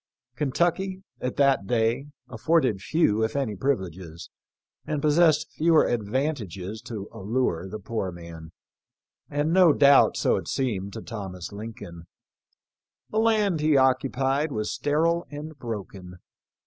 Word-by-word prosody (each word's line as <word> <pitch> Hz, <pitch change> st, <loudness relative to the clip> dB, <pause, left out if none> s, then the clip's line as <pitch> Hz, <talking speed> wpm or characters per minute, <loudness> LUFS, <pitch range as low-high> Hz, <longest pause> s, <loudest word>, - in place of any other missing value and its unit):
Kentucky, 175 Hz, +7 st, -1 dB, 0.2 s
at 125 Hz, -, -3 dB
that 135 Hz, -8 st, +2 dB
day, 120 Hz, +4 st, +1 dB, 0.2 s
afforded 125 Hz, -, +1 dB
few 110 Hz, -5 st, +2 dB
if 110 Hz, -, -2 dB
any 130 Hz, -7 st, -1 dB
privileges, 95 Hz, -, -3 dB, 0.5 s
and 150 Hz, -1 st, -2 dB
possessed 155 Hz, +1 st, +3 dB
fewer 160 Hz, 0 st, +3 dB
advan 125 Hz, +7 st, 0 dB
tages 100 Hz, -2 st, -7 dB
to 110 Hz, -4 st, -7 dB
allure 95 Hz, -4 st, -1 dB
the 110 Hz, -, -5 dB
poor 105 Hz, -2 st, -4 dB
man; 85 Hz, -2 st, -10 dB, 0.8 s
and 145 Hz, +3 st, 0 dB
no 180 Hz, -3 st, +6 dB
doubt 140 Hz, -1 st, +5 dB
so -, -, +2 dB
it -, -, -6 dB
seemed 110 Hz, -7 st, -2 dB
to -, -, -7 dB
Thomas 95 Hz, -6 st, -7 dB
Lincoln. 100 Hz, -6 st, -9 dB, 1.0 s
The 215 Hz, -, +1 dB
land 215 Hz, -6 st, +2 dB
he 150 Hz, -1 st, +3 dB
occupied 135 Hz, +2 st, +1 dB
was 105 Hz, -4 st, -2 dB
sterile 165 Hz, +4 st, 0 dB
and 150 Hz, +2 st, -8 dB
broken. 100 Hz, -6 st, -7 dB
125 Hz, 130 wpm, -25 LUFS, 100-150 Hz, 1.0 s, no